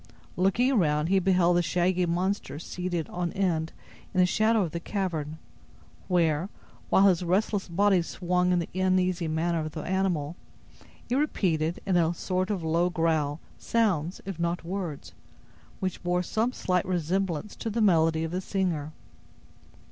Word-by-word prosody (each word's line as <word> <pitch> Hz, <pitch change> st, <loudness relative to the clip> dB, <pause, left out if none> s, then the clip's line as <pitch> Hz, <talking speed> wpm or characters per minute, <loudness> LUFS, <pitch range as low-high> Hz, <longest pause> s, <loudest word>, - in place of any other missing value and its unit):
Looking 210 Hz, +8 st, +2 dB
around, 155 Hz, -, +2 dB
he 195 Hz, 0 st, +4 dB
beheld 180 Hz, -2 st, +3 dB
the -, -, +4 dB
shaggy 180 Hz, +1 st, +1 dB
monster 180 Hz, 0 st, -1 dB
seated 175 Hz, 0 st, -3 dB
on 175 Hz, -1 st, -2 dB
end 165 Hz, -5 st, 0 dB, 0.4 s
in -, -, +2 dB
a -, -, +6 dB
shadow 215 Hz, +3 st, +2 dB
of 165 Hz, -, -3 dB
the 170 Hz, -, -3 dB
cavern, 165 Hz, -5 st, -3 dB, 0.7 s
where, 170 Hz, -1 st, +1 dB, 0.4 s
while 195 Hz, -, +5 dB
his 180 Hz, -3 st, +3 dB
restless 190 Hz, +3 st, 0 dB
body 190 Hz, +1 st, +3 dB
swung 180 Hz, +1 st, 0 dB
in 180 Hz, -, +3 dB
the 170 Hz, -, -2 dB
uneasy 185 Hz, -2 st, +1 dB
manner 165 Hz, +2 st, 0 dB
of 155 Hz, -1 st, -4 dB
the 155 Hz, -, -5 dB
animal, 175 Hz, -5 st, -1 dB, 0.7 s
it 240 Hz, -, -2 dB
repeated, 170 Hz, -, 0 dB
in 190 Hz, -3 st, +2 dB
a 170 Hz, 0 st, +2 dB
sort 185 Hz, +2 st, -1 dB
of 195 Hz, -5 st, -2 dB
low 165 Hz, +2 st, +2 dB
growl, 160 Hz, -3 st, 0 dB, 0.2 s
sounds, 185 Hz, -8 st, 0 dB
if 195 Hz, -4 st, -6 dB
not 170 Hz, 0 st, -1 dB
words, 175 Hz, -5 st, -5 dB, 0.7 s
which 185 Hz, -2 st, -3 dB
bore 180 Hz, 0 st, 0 dB
some 225 Hz, +7 st, 0 dB
slight 180 Hz, -6 st, -1 dB
resemblance 185 Hz, +1 st, -1 dB
to 225 Hz, -, -3 dB
the 225 Hz, +2 st, -2 dB
melody 165 Hz, -6 st, +3 dB
of 165 Hz, -, -3 dB
the 180 Hz, +1 st, -2 dB
singer. 175 Hz, -6 st, -2 dB
180 Hz, 155 wpm, -27 LUFS, 165-190 Hz, 0.7 s, a